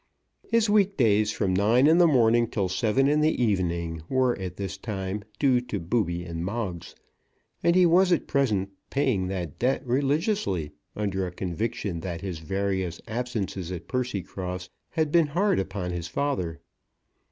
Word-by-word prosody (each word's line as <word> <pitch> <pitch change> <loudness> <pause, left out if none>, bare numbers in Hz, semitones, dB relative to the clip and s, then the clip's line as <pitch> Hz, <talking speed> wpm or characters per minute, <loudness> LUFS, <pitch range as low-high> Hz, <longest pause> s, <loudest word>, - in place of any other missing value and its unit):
His 230 -1 +3
weekdays, 130 - +3
from 95 -3 0
nine 110 +7 +4
in 160 +3 +6
the 175 - +7
morning 120 -4 +4
till 100 -4 -1
seven 110 +8 +2
in 150 +1 +3
the 155 +1 +2
evening, 85 -6 -1
were 130 -2 +2
at 90 -2 -5
this 100 -1 -4
time 100 -1 -4
due 130 -4 +3
to 110 -5 -4
Booby 85 -1 -1
and 85 -1 -5
Moggs, 95 -4 -4 0.7
and 170 0 +3
he 185 -1 +6
was 180 +2 +4
at 175 - +2
present 105 -9 0 0.2
paying 130 -10 +1
that 90 -5 -4
debt 130 +3 +1
religiously, 140 - 0 0.2
under 95 -3 -1
a - - -6
conviction 95 0 -3
that 85 -1 -5
his 90 -5 -4
various 95 0 -2
absences 110 -6 -3
at 85 -2 -6
Percycross 95 -7 -3 0.2
had 155 -3 0
been 165 -2 +4
hard 185 - +1
upon 95 -2 -3
his 85 -2 -4
father. 90 - -2
105 Hz, 155 wpm, -26 LUFS, 90-135 Hz, 0.7 s, the